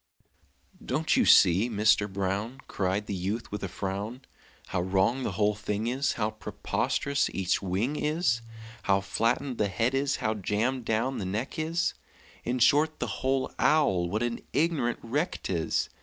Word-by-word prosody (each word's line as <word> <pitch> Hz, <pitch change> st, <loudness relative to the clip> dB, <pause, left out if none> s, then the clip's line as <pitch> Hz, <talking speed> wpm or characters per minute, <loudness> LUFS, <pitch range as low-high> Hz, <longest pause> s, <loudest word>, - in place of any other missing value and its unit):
"Don't -, -, +1 dB
you -, -, +4 dB
see, 95 Hz, +6 st, +6 dB
Mister 105 Hz, -1 st, +3 dB
Brown," 100 Hz, +6 st, -3 dB
Cried 95 Hz, +2 st, -1 dB
the 100 Hz, -, -4 dB
youth, 100 Hz, +5 st, -3 dB
with 105 Hz, 0 st, -4 dB
a -, -, -1 dB
frown, 100 Hz, +7 st, -4 dB, 0.5 s
"How -, -, 0 dB
wrong 95 Hz, +8 st, +1 dB
the 110 Hz, -, -2 dB
whole 105 Hz, +2 st, +2 dB
thing 105 Hz, +1 st, -3 dB
is, 130 Hz, +4 st, 0 dB
How 110 Hz, -1 st, -1 dB
preposterous 140 Hz, +5 st, -1 dB
each 95 Hz, -2 st, +1 dB
wing 100 Hz, +9 st, -1 dB
is, 150 Hz, -6 st, +1 dB, 0.4 s
How 100 Hz, 0 st, +2 dB
flattened 115 Hz, +6 st, -1 dB
the 105 Hz, -, +3 dB
head 115 Hz, +5 st, 0 dB
is, 135 Hz, +1 st, +1 dB
how 110 Hz, -, -1 dB
jammed 110 Hz, +5 st, -1 dB
down 115 Hz, +5 st, 0 dB
the 100 Hz, -, -3 dB
neck 110 Hz, +11 st, -3 dB
is 165 Hz, +2 st, 0 dB, 0.5 s
In 125 Hz, +1 st, -1 dB
short, 150 Hz, +5 st, +4 dB
the -, -, -1 dB, 0.2 s
whole 135 Hz, 0 st, 0 dB
owl, 95 Hz, -, +3 dB
what 105 Hz, +5 st, -1 dB
an 120 Hz, -1 st, -2 dB
ignorant 145 Hz, -5 st, +1 dB
wreck 145 Hz, +9 st, -1 dB
'tis! 85 Hz, -4 st, 0 dB
110 Hz, 160 wpm, -28 LUFS, 100-130 Hz, 0.5 s, see